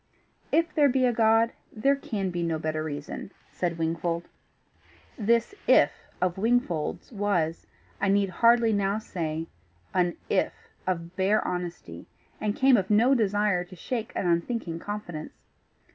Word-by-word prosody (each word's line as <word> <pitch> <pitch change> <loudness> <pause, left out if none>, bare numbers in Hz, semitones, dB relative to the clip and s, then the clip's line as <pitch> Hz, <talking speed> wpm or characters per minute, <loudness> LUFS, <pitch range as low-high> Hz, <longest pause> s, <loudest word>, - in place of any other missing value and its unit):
"If 330 +1 +2
there 290 -3 +5
be 260 0 +2
a 245 - +2
God, 225 +1 +4 0.2
there 275 +6 +2
can 205 -8 -3
be 175 0 -2
no 165 -1 0
better 155 0 -2
reason," 145 +3 -5 0.2
said 170 -2 -2
Wingfold. 165 +1 -1 0.9
This 235 - +1
IF - - +6 0.3
of 180 0 0
Wingfold's 225 -8 0
was, 190 -7 -1 0.3
I - - +2
need 200 0 +3
hardly 230 +3 +4
now 200 0 +1
say, 165 -6 -3 0.5
an 175 -1 +1
IF - - +1 0.3
of 170 -1 -2
bare 195 +3 +2
honesty, 175 - -5 0.3
and 210 0 -1
came 265 -2 +5
of 190 -2 -1
no 230 +6 +5
desire 205 -5 +2
to 180 +1 -13
shake 225 +5 -4
an - - -1
unthinking 170 0 -1
confidence. 175 -6 -6
195 Hz, 145 wpm, -27 LUFS, 170-225 Hz, 0.9 s, IF